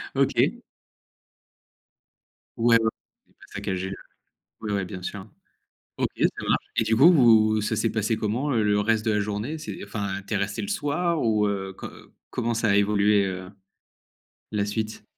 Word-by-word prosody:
OK. - - +2 2.2
Ouais, 115 0 +5
ouais. 110 - +2 0.4
Pas - - -31 0.2
saccager 95 0 -3
le 95 - -5 0.7
ouais, 105 -2 -3
ouais, 100 -2 -1
bien 90 0 -8
sûr. 95 +2 -6 0.7
OK, - - +1
ça - - +5 0.2
marche. - - +1
Et - - +3
du 110 - +1
coup, 145 +9 +8
vous 110 -7 +5
ça 105 - -1
s'est 115 - +1
passé 110 +1 0
comment, 120 +8 -1
le 105 -4 +2
reste 110 +1 +1
de 110 - +3
la 105 - +1
journée? 105 +9 -3
C'est 155 - -7
enfin 100 -2 -4
tu 110 - -3
es - - +2
resté 100 +1 -2
le 205 - -5
soir 170 -1 0
ou, 110 -2 +2
heu, 95 -1 -3
co - - -8 0.4
comment 120 -1 -1
ça 110 -1 0
a 100 - +4
évolué, 100 0 +3
heu, 95 0 -5 1.0
la 105 -1 0
suite? 110 +1 -4
105 Hz, 170 wpm, -25 LUFS, 100-115 Hz, 2.2 s, coup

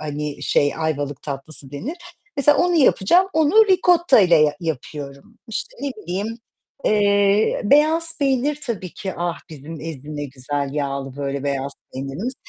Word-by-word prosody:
hani, 150 -1 -5
şey, 145 0 +2
Ayvalık 145 -3 -2
tatlısı 140 0 -5
denir. 245 - -5 0.4
Mesela 290 +1 +4
onu 355 0 +2
yapacağım. 340 - +4
Onu 320 +8 +5
ricottayla 345 - +5
ya 150 -1 +3
yapıyorum. 145 - -6
İşte, 225 +1 -5
ne 280 - -1
bileyim, 210 +4 -4 0.5
eee, 205 0 +3
beyaz 315 +7 +3
peynir 280 +1 +1
tabii 190 -7 -4
ki. 190 -2 -5
Ah 175 0 -2
bizim 155 +1 -9
ezine 150 -2 -7
ne 145 - -3
güzel 140 +1 -4
yağlı, 140 -2 -3
böyle, 140 -1 -3
beyaz 140 0 -2 0.2
peynirimiz. 140 - -4
170 Hz, 140 wpm, -21 LUFS, -, 0.5 s, Onu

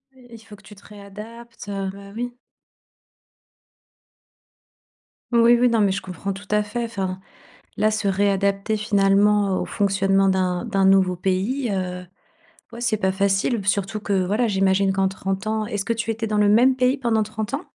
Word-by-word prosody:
Il 245 -3 -14
faut 215 -1 -14
que 195 - -20
tu 210 - -14
te 200 - -19
réadaptes, 210 +2 -11
heu, 195 -1 -3
bah 200 0 -12
oui. 245 +1 -4 3.0
Oui, 235 0 +5
oui, 250 0 +4
non 230 -1 +1
mais 200 - +3
je 195 - -2
comprends 190 +2 -5
tout 195 0 -11
à 210 0 +2
fait, 210 +3 -4
enfin, 190 -5 -4 0.6
là 215 0 +2
se 215 -1 -1
réadapter 200 +1 +1
finalement 205 -1 +2
au - - -3
fonctionnement 195 -1 +1
d'un 185 +1 0
d'un 195 -4 +1
nouveau 190 -1 +4
pays, 195 +9 -1
heu, 180 -2 -3 0.7
ouais, 235 - -8
c'est 240 -3 0
pas 190 -2 +1
facile, 195 +4 +1
b 200 - -6
surtout 200 +1 -1
que 205 -1 -4
voilà, 210 +6 +1
j'imagine 195 -1 +2
qu'en 195 0 +1
30 190 +2 -4
ans 220 0 -1
est-ce 205 -1 -3
que 230 - -1
tu 230 0 -2
étais 225 0 -4
dans 210 - -1
le 205 -1 +4
même 245 +5 +4
pays 255 +1 +2
pendant 225 -4 +1
30 215 +1 -5
ans? 285 +6 -3
205 Hz, 180 wpm, -22 LUFS, 195-225 Hz, 3.0 s, Oui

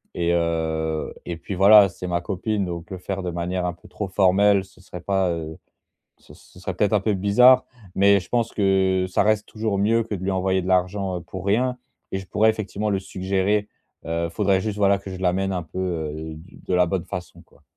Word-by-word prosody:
et 85 0 +1
heu, 80 -2 -1
et 85 -1 -5
puis, 95 +4 -6
voilà, 100 +2 +8
c'est 90 0 -8
ma 85 -1 0
copine. 100 +2 -2
Donc, 85 0 -6
heu, - - -3
le - - -10
faire 95 +1 -4
de 90 - -3
manière 90 +2 -2
un 90 - 0
peu 90 - -18
trop 105 - -5
formelle, 95 +1 +3
ce 95 0 -21
serait 90 -1 -9
pas, 95 0 0
heu, 80 -1 -5 0.6
ce - - -17
ce 90 - -18
serait 95 0 -4
peut-être 105 +3 +1
un 105 - +3
peu 105 +1 0
bizarre. 125 +7 +5 0.3
Mais 100 +1 +5
je 90 - -13
pense 120 -2 0
que 95 -2 +2
ça 95 - +2
reste 105 -1 +1
toujours 110 -2 -2
mieux 115 +3 +2
que 110 - -5
de 95 - -6
lui 100 - 0
envoyer 95 0 0
de 90 - -5
l'argent, 95 +1 0
heu, - - -10
pour 95 +1 -8
rien 125 +5 +1 0.3
et 95 - -1
je 95 - -12
pourrais, 110 +1 +3
effectivement, 105 -1 -3
le 100 -1 0
suggérer. 95 +2 -1 0.4
Heu, 85 +1 -1
faudrait, 95 +1 +1
juste, 105 0 -4
voilà, 100 -1 +3
que 95 0 -9
je 95 - -6
l'amène 95 +1 0
un 90 -2 -2
peu, 85 - -9
heu, 80 -3 -4
du 85 +5 -15
de - - -3
la 90 0 +4
bonne 90 0 -2
façon, 90 -1 -7
quoi. 70 - -26
95 Hz, 230 wpm, -23 LUFS, 90-100 Hz, 0.6 s, voilà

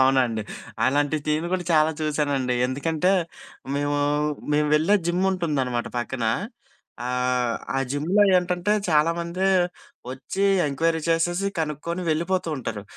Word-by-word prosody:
అవునండి. 130 -4 +3 0.4
అలాంటి 145 +3 +2
టీన్‌లు 155 +3 0
కూడా 185 -1 -1
చాలా 155 0 +4
చూశానండి 145 -4 0
ఎందుకంటే, 160 +7 0 0.6
మేము 145 0 0 0.5
మేము 150 0 +2
వెళ్ళే 160 +7 +3
జిమ్ 175 +2 +1
ఉంటుందనమాట 135 -9 -1
పక్కన 120 0 -3 0.8
ఆహ్, 125 -1 0 0.2
ఆ - - +2
జిమ్‌లో 160 +9 +2
ఏంటంటే 180 +2 0 0.2
చాలామంది 170 +4 +1 0.7
వచ్చి, 135 +9 -3 0.2
ఎంక్వైరీ 160 +4 0
చేసేసి, 175 +3 +1
కనుక్కొని 160 +3 -3
వెళ్ళిపోతూ 170 +3 0
ఉంటారు. 110 -5 -5
150 Hz, 110 wpm, -24 LUFS, 135-170 Hz, 0.8 s, చాలా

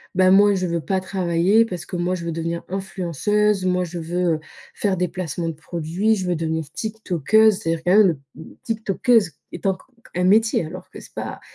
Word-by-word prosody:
«Ben, 185 0 +5
moi, 205 +1 +6
je 185 -1 -1
veux 170 0 -1
pas 190 +4 -1
travailler 185 +3 +2
parce 180 -5 -6
que - - -6
moi, 175 +1 0
je 170 - -6
veux 170 - -3
devenir 165 +1 -3
influenceuse. 195 +2 0
Moi, 180 0 +1
je 175 0 -6
veux, 175 +1 0
heu, - - -6 0.4
faire 200 -2 0
des 180 0 0
placements 170 -2 -3
de - - -4
produits. 170 +7 -1
Je 185 -2 -3
veux 175 - +1
devenir 160 -2 -3
Tiktokeuse». 215 -1 +2
C'est 165 - -3
à - - 0
dire, 160 - -10
quand 180 +3 +4
même, 175 -10 +4
mmh, 160 - -10 0.2
Tiktokeuse 225 -2 +1 0.2
est 175 - -7
poc 190 -1 -1 0.3
un 180 - 0
métier, 215 +2 +4
alors 180 +4 -9
que - - -10
c'est - - -15
pas - - -5
180 Hz, 215 wpm, -22 LUFS, 170-200 Hz, 0.4 s, moi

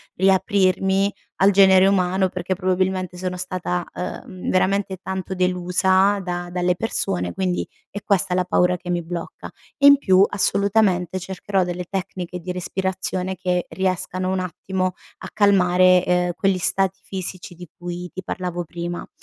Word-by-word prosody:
riaprirmi 190 0 +2 0.3
al 195 +1 +5
genere 190 -1 +6
umano, 190 -1 +2
perché 185 +1 -3
probabilmente, 185 -1 -1
sono 180 0 -4
stata, 180 -1 -3
uhm, 180 0 -6
veramente 190 +1 +1
tanto 190 0 -4
delusa 185 +2 +2
da 175 -1 -4
dalle 180 0 +1
persone 195 -2 -2
quindi, 185 -2 -1 0.2
è 205 - -6
questa 195 -3 +1
la 180 0 +2
paura 180 0 +2
che 180 - -10
mi 175 -1 -1
blocca 170 0 -6 0.3
e 280 - +2
in 285 0 +9
più 190 -6 +5
assolutamente 200 -3 +1
cercherò 190 +1 -1
delle 180 0 -4
tecniche 180 -2 -5
di 180 +1 -5
respirazione 185 +1 -3
che 180 -1 -1
riescano 185 0 -2
un 190 - 0
attimo 185 +1 -3 0.3
a - - -8
calmare, 185 -3 +4
uhm, 180 0 +2
quegli 195 -1 +1
stati 195 +1 0
fisici 185 -1 -6
di 175 -1 -12
cui 175 0 -6
ti 185 - -7
parlavo 175 -1 -4
prima. 175 +1 -6
185 Hz, 145 wpm, -22 LUFS, 180-190 Hz, 0.3 s, in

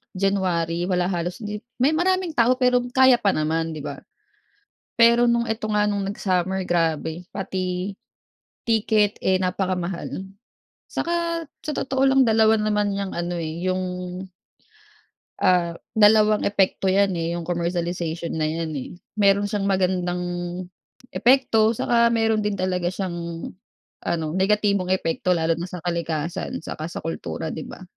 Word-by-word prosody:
January 180 -3 0
wala 180 0 +1
halos 175 +4 -3
hindi 210 0 -4 0.2
-may 260 +4 +3
maraming 365 +2 +1
tao 250 -3 +3
pero 250 -1 +3 0.2
kaya 260 -2 +6
pa 200 -4 +2
naman 160 +1 -1
di 150 - -7
ba? - - -6 1.0
Pero 235 +1 +5
nung 235 0 +2
eto 225 -1 -3
nga 210 -1 +2
nung 205 -1 0
nag-summer 190 -1 -1
grabe 165 0 -1
pati, 185 -1 -3 0.8
ticket 215 -2 +2
eh, 190 0 +3
napakamahal. 185 0 -2 0.6
Saka 335 -1 -1 0.2
sa 305 - -3
totoo 265 0 -1
lang 270 0 +5
dalawa 220 0 +4
naman 210 -1 +1
niyang 200 -1 -3
ano 175 +1 -2
eh 165 +1 -4
yung 185 0 0 1.6
ah, 175 -2 +3 0.2
dalawang 215 0 +5
epekto 195 -1 +1
yan 195 -1 +3
eh 165 0 -2
yung 170 -1 -5
commercialization 170 -1 -2
na 155 - 0
yan 160 +1 -2
eh. 135 - -5 0.3
Meron 200 0 +3
siyang 205 -1 -2
magandang 185 -2 0 0.9
epekto 235 -4 +4
saka 235 +1 +2
meron 225 -2 +1
din 210 - 0
talaga 180 -1 0
siyang 170 -3 -4 0.5
ano 165 -2 -1
negatibong 200 -1 +1
epekto 180 0 0
lalo 165 -1 +1
na 170 - -4
sa 180 -1 -7
kalikasan 170 0 -3
saka 155 -1 -5
sa - - -5
kultura 120 - -4
di - - -5
ba? - - -10
190 Hz, 140 wpm, -23 LUFS, 175-215 Hz, 1.6 s, kaya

